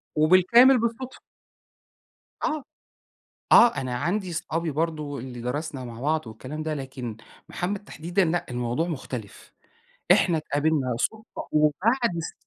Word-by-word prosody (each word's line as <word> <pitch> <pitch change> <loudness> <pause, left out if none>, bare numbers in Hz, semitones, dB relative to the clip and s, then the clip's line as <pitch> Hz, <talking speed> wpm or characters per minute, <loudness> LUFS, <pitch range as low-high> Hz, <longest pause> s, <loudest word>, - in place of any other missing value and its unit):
وبالكامل 185 +12 +6
بالصُدفة. 235 +3 -3 1.2
آه. 310 -3 -1 0.9
آه. 240 - +8
أنا 125 -1 -3
عندي 180 +8 -1
اصحابي 165 0 -2
برضه 150 -2 -2
اللي 125 -1 -7
درسنا 130 +1 -4
مع 115 0 -9
بعض 155 -1 0
والكلام 130 +8 -7
ده، 155 - -2
لكن 130 -5 -6 0.3
محمد 195 +3 -3
تحديدًا 175 +1 -1
لأ، 170 +1 0
الموضوع 125 +6 -1
مختلف. 130 - -7 0.6
إحنا 175 -3 +4
اتقابلنا 145 -4 0
صُدفة 220 0 -4
وبعد 175 - +2
س 165 - -5
155 Hz, 120 wpm, -25 LUFS, 130-185 Hz, 1.2 s, آه